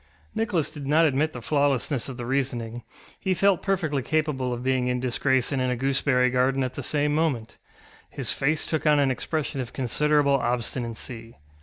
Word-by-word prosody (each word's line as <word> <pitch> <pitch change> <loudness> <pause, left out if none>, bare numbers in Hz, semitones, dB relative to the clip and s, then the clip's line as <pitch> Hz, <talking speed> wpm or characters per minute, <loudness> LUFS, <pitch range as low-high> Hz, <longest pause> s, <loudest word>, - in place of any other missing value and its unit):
Nicholas 210 -8 0
did 145 -3 -7
not 160 +3 +4
admit 150 +1 +1
the 125 -5 -8
flawlessness 140 -2 +1
of 130 - -7
the 120 - -5
reasoning; 120 -3 -2 0.4
he 190 -1 0
felt 195 -1 +3
perfectly 165 -8 0
capable 145 -3 -1
of 120 0 -4
being 130 -1 +1
in 125 0 0
disgrace 130 +1 +1
and 135 -2 0
in 130 - +1
a 125 - 0
gooseberry 130 0 +2
garden 130 +1 +2
at 130 - -3
the - - -5
same 145 -1 0
moment. 145 -8 -1 0.5
His - - -3
face 150 +3 0
took 155 -1 -1
on 150 -1 +5
an 140 -2 +3
expression 140 +1 -2
of 125 - -7
considerable 145 +3 +2
obstinacy. 120 -1 -4
135 Hz, 180 wpm, -25 LUFS, 125-150 Hz, 0.5 s, on